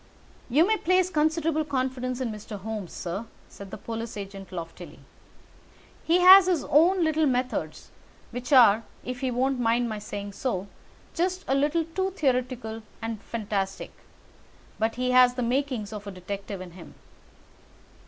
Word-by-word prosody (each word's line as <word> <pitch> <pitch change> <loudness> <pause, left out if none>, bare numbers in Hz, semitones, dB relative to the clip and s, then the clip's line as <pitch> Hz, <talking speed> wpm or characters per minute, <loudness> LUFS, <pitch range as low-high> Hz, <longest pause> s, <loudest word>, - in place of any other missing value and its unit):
"You 295 +7 +5
may 435 +2 +2
place 370 0 +2
considerable 315 0 +1
confidence 255 -3 -2
in 250 -3 -2
Mr. 210 0 -7
Holmes, 210 -2 -5
sir," 195 +6 -5 0.2
said 200 -1 -11
the - - -7
police 225 -1 -6
agent 195 -1 -8
loftily. 165 -2 -8 1.1
"He 345 +2 +3
has 375 +1 +9
his 350 -5 +1
own 340 +5 +4
little 315 -1 +2
methods, 255 0 -2 0.4
which 245 +2 -6
are, 230 -5 +7 0.2
if 250 0 -4
he 265 -1 -1
won't 255 +2 0
mind 235 0 +1
my 215 -1 -4
saying 205 -1 -6
so, 195 -6 -2 0.5
just 370 +2 -1
a - - +1
little 295 +4 +1
too 375 +4 -2
theoretical 250 - -1 0.2
and 225 -2 -5
fantastic, 200 -4 -3 0.9
but 220 +1 0
he 250 +1 0
has 250 0 +6
the 250 - -1
makings 245 -4 -1
of 205 -1 -7
a - - -5
detective 195 +1 -6
in 180 -1 -9
him. 170 0 -13
245 Hz, 155 wpm, -26 LUFS, 210-295 Hz, 1.1 s, has